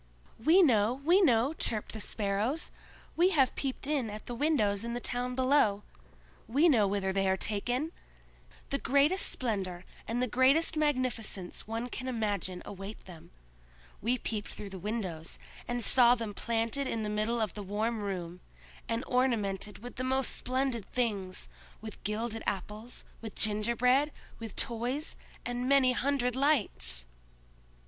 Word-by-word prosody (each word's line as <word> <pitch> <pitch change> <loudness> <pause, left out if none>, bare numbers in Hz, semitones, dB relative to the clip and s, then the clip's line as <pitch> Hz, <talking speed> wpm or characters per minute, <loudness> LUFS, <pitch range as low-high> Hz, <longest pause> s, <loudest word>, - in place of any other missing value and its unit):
"We 345 +7 +6
know! 225 -6 +4
we 335 +9 +3
know!" 255 - +4
chirped 220 -9 -2
the 220 - -5
Sparrows. 210 +8 -1 0.4
"We 350 +2 +4
have 265 -2 +4
peeped 270 -1 -3
in 280 -6 0
at 210 +1 -8
the 245 - -5
windows 230 -7 +1
in 235 0 -3
the 240 - -2
town 245 +1 -2
below! 255 -6 +3 0.6
We 285 +9 +4
know 225 -10 +4
whither 195 -1 -1
they 195 0 +1
are 190 - +2
taken! 245 +10 0 0.8
The 275 - 0
greatest 285 +9 +2
splendor 190 -7 -3 0.2
and 230 +2 -1
the 250 - +2
greatest 265 +7 +3
magnificence 255 -12 -1
one 225 +2 -3
can 255 +1 -6
imagine 205 -6 -2
await 195 +2 -8
them. 170 -4 -12 0.7
We 240 +4 +1
peeped 215 -3 -4
through 200 -2 -8
the 190 - -7
windows, 185 -6 -4 0.3
and 240 0 -1
saw 245 0 +6
them 225 -3 -5
planted 230 +5 -1
in 225 -3 -2
the - - -2
middle 215 +3 0
of 215 -5 -1
the 210 - -6
warm 215 +4 -1
room, 180 -4 -4 0.5
and 230 +2 -1
ornamented 210 -5 0
with 245 - -9
the 255 - -2
most 260 0 +1
splendid 255 -4 -2
things—with 215 -1 -5
gilded 220 +2 -2
apples, 210 +5 -4 0.2
with 220 -2 -7
gingerbread, 235 +7 +2 0.3
with 225 -4 -7
toys, 245 +6 -2 0.3
and 245 +1 -2
many 275 -2 +5
hundred 250 -1 0
lights!" 225 - +4
230 Hz, 150 wpm, -31 LUFS, 205-260 Hz, 0.8 s, We